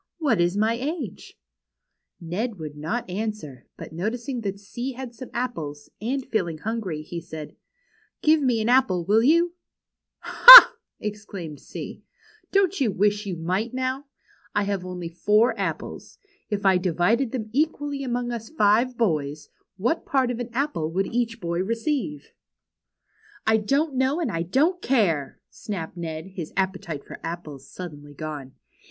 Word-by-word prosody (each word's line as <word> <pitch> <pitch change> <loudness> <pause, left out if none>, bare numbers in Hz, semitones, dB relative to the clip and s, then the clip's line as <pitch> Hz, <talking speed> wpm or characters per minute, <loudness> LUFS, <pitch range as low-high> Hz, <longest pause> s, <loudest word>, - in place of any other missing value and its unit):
What 275 - +1
is 175 +3 +1
my 220 +2 +2
age? 270 - -5 0.4
" - - -56 0.2
Ned 200 +7 -4
would 155 -3 -7
not 165 +12 -3
answer, 185 - -5
but - - -10
noticing 235 - -3
that 200 -2 -4
C 240 +6 -6
had 250 -1 -8
some 255 +2 -10
apples, 155 -13 -5
and 260 +4 -2
feeling 175 -8 -2
hungry, 190 -5 -4
he 170 +2 -7
said: 155 -2 -9 0.3
" - - -39
Give 310 0 +4
me 245 -5 +1
an 215 - -1
apple, 240 -9 +3
Avill 215 +4 +3
you? 335 +5 +3 0.2
" - - -64
" - - -63
Ha! - - +12
" - - -62
exclaimed 205 -8 -7
C, - - -9 0.5
don't 390 -4 +2
you 250 - +3
wish 205 +2 0
you 185 - -3
might, 185 +9 -2
now? 260 +2 -2 0.5
I 205 - +2
have 200 -2 -2
only 180 -2 -6
four 210 +7 +2
ajoples. - - -5 0.3
If 205 -2 -3
I 190 -2 +5
divided 190 +8 +1
them 220 -4 -5
equally 290 -1 -1
among 245 -1 -2
us 230 -1 -6
five 235 -1 +2
boys, 155 -9 -1 0.3
what 240 - 0
part 260 -3 +1
of 240 - -5
an 245 0 -4
apple 240 - -2
would 190 +3 0
each 235 -1 -1
boy 170 -2 -3
receive? 225 - -3 0.4
' - - -61
' - - -41 0.3
''I 220 0 +5
don't 280 +6 +1
know 265 +4 +1
and 320 -10 -1
I 165 -2 -2
don't 300 - +1
care," 175 - 0
snapped 180 -6 -6
Ned, 160 -2 -5
his 185 -4 -8
appetite 185 -6 -2
for - - -10
apples 155 -5 -7
suddenly 145 -5 -9
gone. 145 -3 -7
210 Hz, 165 wpm, -24 LUFS, 170-250 Hz, 0.5 s, Ha